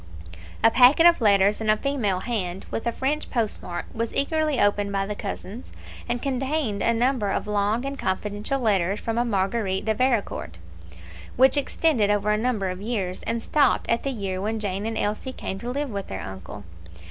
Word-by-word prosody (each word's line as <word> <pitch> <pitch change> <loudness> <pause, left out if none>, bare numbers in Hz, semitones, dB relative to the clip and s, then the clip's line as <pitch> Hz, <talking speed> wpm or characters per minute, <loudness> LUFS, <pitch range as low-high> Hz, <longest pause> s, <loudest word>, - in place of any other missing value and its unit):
A 225 - +7
packet 255 +8 +6
of 345 -5 +6
letters 200 0 +4
in 220 - -1
a 215 - +5
female 215 -8 -1
hand, 195 -6 -3
with 225 - -3
a - - +2
French 280 +6 -2
post 230 -4 -1
mark, 175 -1 -5
was 230 0 -2
eagerly 305 0 +1
opened 205 0 +2
by 195 0 0
the 210 - -3
cousins, 205 +2 -7 0.4
and 240 0 -2
contained 270 -5 -1
a 230 - +3
number 235 -2 +1
of - - -1
long 210 +4 0
and 275 0 -4
confidential 205 +7 -2
letters 200 -4 +1
from 230 0 -2
a - - +3
Marguerite 195 -2 -1
de 220 - +2
Vericourt, 210 - -1 0.8
which 265 +3 +5
extended 285 -6 +2
over 205 0 +2
a - - +3
number 215 -4 -1
of 185 +1 -7
years, 200 -5 -3
and 230 0 -1
stopped 295 -2 +2
at 230 - +2
the 275 - -2
year 195 -7 -3
when 220 +2 -2
Jane 200 0 -2
and 225 -1 -3
Elsie 215 +6 -2
came 190 - -5
to 240 - -5
live 280 +1 -2
with 200 -1 -4
their 95 0 -5
uncle. 95 +2 -8
215 Hz, 195 wpm, -24 LUFS, 200-250 Hz, 0.8 s, A